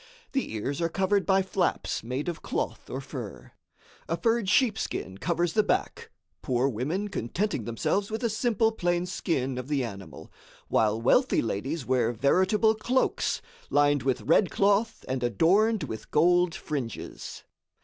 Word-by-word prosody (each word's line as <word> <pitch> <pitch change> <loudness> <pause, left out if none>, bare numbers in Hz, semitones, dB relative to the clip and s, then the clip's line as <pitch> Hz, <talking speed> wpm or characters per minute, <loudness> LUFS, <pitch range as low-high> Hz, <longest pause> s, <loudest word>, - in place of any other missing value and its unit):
The 270 - -2
ears 135 +8 -3
are 165 - +1
covered 195 +2 +1
by 190 -1 +4
flaps 190 -1 -1
made 130 +6 -4
of 170 -2 -4
cloth - - -3
or - - -4
fur. - - -8 0.6
A - - 0
furred 230 -4 +1
sheepskin 210 - 0
covers 170 +3 0
the 215 - +4
back, 205 - -1 0.3
poor 125 +1 +1
women 145 - -2
contenting 175 - -2
themselves 190 - -1
with 220 +3 -4
a - - +3
simple 225 0 +1
plain 175 -4 0
skin 135 -8 -2
of 125 - -6
the 140 -3 0
animal, 95 - -8 0.4
while 110 0 +2
wealthy 245 - +3
ladies 130 +7 -3
wear 125 -3 +2
veritable 190 - +3
cloaks, 245 +4 0 0.3
lined 145 -1 +3
with 130 +1 0
red 170 +3 +3
cloth 205 +7 +1
and 130 -1 -2
adorned 190 - +3
with 110 - -6
gold 175 +2 +3
fringes. 135 -7 -5
170 Hz, 150 wpm, -27 LUFS, 125-205 Hz, 0.6 s, by